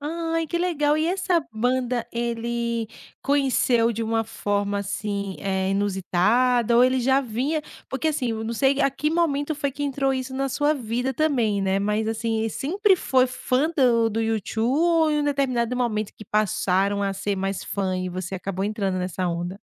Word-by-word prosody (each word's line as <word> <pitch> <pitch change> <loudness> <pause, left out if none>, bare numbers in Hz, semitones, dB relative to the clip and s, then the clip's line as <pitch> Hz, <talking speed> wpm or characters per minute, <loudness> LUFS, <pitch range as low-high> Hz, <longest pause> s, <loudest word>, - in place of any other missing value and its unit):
Ai 330 +2 -2
que 340 - -2
legal. 305 -4 +1
E 315 - +1
essa 365 -1 +1
banda 245 +1 0
ele 235 0 -2 0.4
conheceu 260 -4 +2
de 230 - -3
uma 225 0 0
forma 205 -2 -1
assim, 200 -1 -3
eh, 190 -1 -1
inusitada? 205 +5 +2
Ou 245 - +7
ele 255 0 +2
já 265 +2 +3
vinha 265 +6 -2 0.3
porque, 265 +4 -1
assim, 285 -5 -1
eu 220 0 -3
não 225 - -3
sei 270 +3 +2
a 275 - +3
que 295 +3 -1
momento 310 -3 0
foi 280 -1 -2
que 290 +2 -6
entrou 275 -1 0
isso 260 0 -4
na 270 0 -1
sua 295 +3 +2
vida 245 +1 -2
também, 240 -9 +1
né, 195 0 +1
mas, 210 +2 0
assim, 225 0 -1
ele 225 0 -1
sempre 385 - +2
foi 260 -7 +2
fã 255 +4 0
do 235 -5 +3
do 225 - -1
U2 225 -2 -2
ou 320 +6 +3
em 300 - +1
um 290 - -1
determinado 255 -4 0
momento 215 -4 -1
que 215 - -11
passaram 200 -1 +1
a 195 -1 0
ser 200 +1 -2
mais 195 0 -3
fã, 190 -2 -2
e 185 0 -2
você 185 +1 -5
acabou 190 +1 -3
entrando 200 -3 -1
nessa 180 0 -2
onda? 175 +2 -3
235 Hz, 185 wpm, -24 LUFS, 205-275 Hz, 0.4 s, Ou